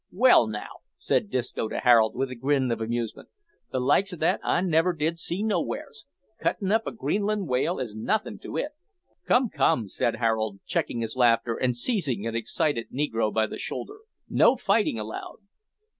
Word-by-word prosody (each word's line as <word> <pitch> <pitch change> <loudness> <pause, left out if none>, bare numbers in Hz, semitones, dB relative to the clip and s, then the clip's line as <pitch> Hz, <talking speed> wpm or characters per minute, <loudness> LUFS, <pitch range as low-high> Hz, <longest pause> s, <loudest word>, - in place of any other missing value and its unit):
"Well, 225 - +5
now," 105 -1 -6 0.2
said 100 - 0
Disco 125 -2 -2
to - - -4
Harold, 115 -3 +4
with 130 0 -2
a - - -5
grin 130 0 +1
of 115 - -2
amusement, 115 0 -3 0.4
"the 130 - -1
likes 190 +10 +2
o' - - -5
that 160 0 +1
I - - +2
never 175 0 +2
did 165 +1 -1
see 175 +4 -2
nowheres. 160 - -3 0.3
Cuttin' 195 -3 -1
up 225 +1 +2
a - - -2
Greenland 210 -3 -1
whale 135 +7 0
is 115 -5 -4
nothin' 210 - -1
to - - -6
it." 295 - -2 0.6
"Come, 245 -1 +3
come," 125 - +1
said 115 - -1
Harold, 110 -3 0
checking 115 - -1
his 115 +1 -3
laughter 120 -2 +3
and 125 0 0
seizing 135 - -1
an 115 0 -3
excited 115 +1 -1
negro 115 -6 0
by 110 0 +2
the - - -7
shoulder, 420 +1 -5 0.3
"no - - +4
fighting 210 - +1
allowed." 110 0 -6
125 Hz, 175 wpm, -26 LUFS, 115-180 Hz, 0.6 s, Well